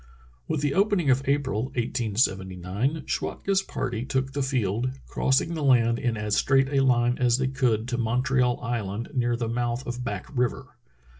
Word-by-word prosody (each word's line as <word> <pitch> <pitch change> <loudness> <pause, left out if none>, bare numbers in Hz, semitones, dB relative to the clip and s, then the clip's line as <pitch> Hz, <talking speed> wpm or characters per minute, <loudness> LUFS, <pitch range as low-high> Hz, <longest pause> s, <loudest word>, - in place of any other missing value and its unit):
With 150 - -1
the 145 -1 +1
opening 195 -7 +2
of 130 +1 +3
April, 135 -5 0
1879, 110 - -1
Schwatka's 195 -1 -1
party 120 -10 -3
took 135 0 -2
the 140 - -1
field, 125 -3 0 0.2
crossing 135 +5 +1
the 160 -2 -3
land 120 -3 +4
in 120 -2 -1
as 105 0 -1
straight 135 0 +3
a 140 -1 +1
line 120 -2 +2
as 120 -1 +3
they 130 0 0
could 125 -4 0
to 120 -1 -2
Montreal 125 +2 +1
Island, 115 -2 -3
near 120 -3 +1
the 115 -1 -2
mouth 120 +2 -2
of 120 +1 -4
Back 105 -5 -4
River. 125 -1 -1
125 Hz, 165 wpm, -26 LUFS, 115-135 Hz, 0.2 s, land